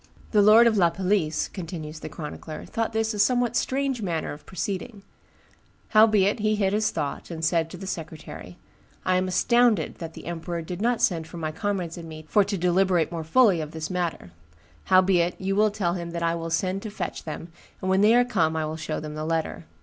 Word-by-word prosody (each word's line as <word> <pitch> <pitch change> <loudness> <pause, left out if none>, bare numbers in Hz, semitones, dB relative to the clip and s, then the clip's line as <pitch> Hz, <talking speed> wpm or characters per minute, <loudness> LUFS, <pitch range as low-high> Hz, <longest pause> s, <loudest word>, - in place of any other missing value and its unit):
"The 210 - +5
lord 215 +3 +7
of 225 -2 +3
La 175 -3 +5
Palisse," 180 -3 0
continues 160 -4 -7
the - - -7
chronicler, 155 0 -7
"thought 225 0 -2
this 220 0 0
a 210 - -5
somewhat 245 +2 +2
strange 270 -2 0
manner 170 -5 -2
of 145 - -13
proceeding; 200 +3 -4 0.9
howbeit 215 -1 +4
he 215 0 +2
hid 195 -2 +1
his 215 0 +2
thought, 145 -3 -4
and 165 -1 -3
said 165 -1 +1
to 180 - -9
the 190 - -8
secretary, 160 - -7 0.5
'I 185 0 +3
am 185 0 0
astounded 230 -1 +2
that 165 -1 -7
the - - -10
emperor 170 0 -4
did 180 +3 -6
not 240 +1 +1
send 165 -7 +1
for 165 - -10
my 155 -2 -3
comrades 180 -1 -3
and 165 -1 -9
me 155 0 -9
for 205 - +4
to 200 0 -3
deliberate 180 -1 +2
more 165 -2 -4
fully 190 0 +4
of 155 0 -7
this 160 +1 -5
matter; 175 - -3 0.5
howbeit 185 -2 +3
you 195 +1 -1
will 215 +1 +4
tell 200 -5 -1
him 170 -1 -4
that 170 0 -3
I 165 0 +2
will 165 0 -4
send 185 +4 -1
to 215 - -6
fetch 205 - -5
them, 160 +2 -6 0.3
and 185 - -4
when 190 +1 +3
they 215 +3 +6
are 245 0 +5
come 160 -10 +1
I 160 -1 0
will 155 +1 -4
show 155 -1 -3
them 150 0 -6
the 155 0 -4
letter. 160 - -2
180 Hz, 215 wpm, -25 LUFS, 160-210 Hz, 0.9 s, lord